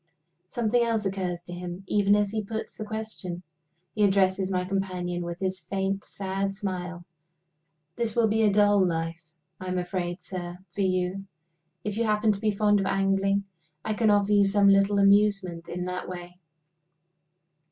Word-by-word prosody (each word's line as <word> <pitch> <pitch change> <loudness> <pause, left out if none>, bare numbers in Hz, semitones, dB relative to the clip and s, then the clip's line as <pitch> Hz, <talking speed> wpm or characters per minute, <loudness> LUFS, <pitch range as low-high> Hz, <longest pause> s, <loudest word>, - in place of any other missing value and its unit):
Something 240 0 +1
else 225 -3 0
occurs 185 -3 -2
to 175 - -9
him, 175 +1 -6
even 200 +1 +3
as 205 -1 +1
he 215 0 -2
puts 220 +2 -5
the 215 - -6
question. 210 -5 -5 0.5
He 210 - +1
addresses 190 -1 +3
my 180 -1 0
companion, 180 -2 -2
with 170 0 -5
his 190 0 -2
faint, 195 +2 -2
sad 195 0 -3
smile. 180 -3 -5 0.9
"This 230 -2 -1
will 235 -2 +4
be 220 +1 +1
a 215 -2 +4
dull 205 -1 +4
life, 165 -1 -2 0.4
I 185 - -7
am 185 0 -1
afraid, 175 0 -3
sir, 175 -1 -6 0.2
for 200 - -2
you. 185 +1 0 0.6
If 210 0 -3
you 230 - +1
happen 215 0 +3
to 200 -1 -3
be 220 - +2
fond 205 0 +3
of 195 - -1
angling, 195 +1 +1 0.4
I 215 - 0
can 220 0 +2
offer 205 0 +3
you 205 -1 +5
some 200 0 +4
little 195 +1 +4
amusement 200 -4 +3
in 180 +1 -4
that 180 0 -4
way. 180 0 -8
195 Hz, 170 wpm, -27 LUFS, 180-205 Hz, 0.9 s, you